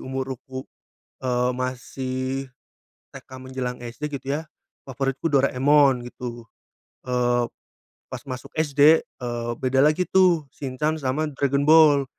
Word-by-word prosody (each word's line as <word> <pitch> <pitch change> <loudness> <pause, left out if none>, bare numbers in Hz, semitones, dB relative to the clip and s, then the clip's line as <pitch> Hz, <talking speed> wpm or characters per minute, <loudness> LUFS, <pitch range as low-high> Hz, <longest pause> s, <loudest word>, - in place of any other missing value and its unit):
umur 130 0 -4
um 130 +1 -8 0.6
eee, 125 0 +1
masih 130 0 -4 0.9
TK - - -13
menjelang 130 -1 -5
SD 125 +5 -6
gitu - - -22
ya - - -3 0.4
favoritku 135 +3 -2
Doraemon 140 0 +4
gitu. 120 -1 -7 0.6
eee, 120 -1 +1 0.7
pas 125 - -6
masuk 125 -1 -7
SD, 150 0 +5
eee, 120 -1 -5
beda 130 +1 +1
lagi 155 +5 +3
tuh, 180 -6 +3
Shincan 150 +4 -2
sama 145 +3 -1
Dragon 140 +1 0
Ball. 150 -3 +6
130 Hz, 120 wpm, -24 LUFS, 125-145 Hz, 0.9 s, Ball